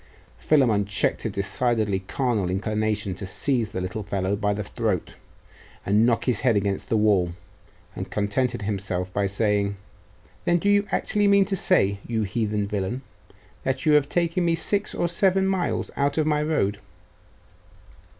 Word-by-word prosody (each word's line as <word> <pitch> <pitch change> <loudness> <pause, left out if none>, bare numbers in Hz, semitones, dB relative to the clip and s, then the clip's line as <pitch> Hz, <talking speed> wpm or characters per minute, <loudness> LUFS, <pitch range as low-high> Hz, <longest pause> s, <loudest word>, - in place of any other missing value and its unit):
Philammon 120 -9 +3
checked 100 +3 0
a - - +1
decidedly 105 0 0
carnal 105 -1 -1
inclination 105 +1 -1
to 95 +1 -7
seize 120 +2 0
the - - -4
little 95 +4 -4
fellow 100 -1 -1
by 105 0 0
the 105 +1 -2
throat, - - -2 0.7
and 105 +4 +3
knock 115 -1 +1
his 120 -5 +2
head 120 -4 +2
against 100 -1 -2
the 110 - +2
wall, 100 -5 +2 0.6
and - - -5
contented 120 +3 -1
himself 95 -3 -3
by 100 -1 +1
saying 100 0 0 0.7
'Then 175 - +3
do 200 +4 0
you 205 0 +3
actually 205 -1 +1
mean 200 -1 +5
to 195 +1 -1
say, 100 - +2
you 115 -2 0
heathen 105 0 -1
villain, 105 +6 -3 0.6
that 130 0 -2
you 155 - +4
have 145 -1 +4
taken 175 +1 0
me 170 -1 +2
six 200 +5 -1
or 175 - 0
seven 190 +2 +2
miles 190 -2 -1
out 140 +2 0
of 155 - +2
my 150 -1 +1
road? 125 -10 0
110 Hz, 160 wpm, -24 LUFS, 100-150 Hz, 0.7 s, mean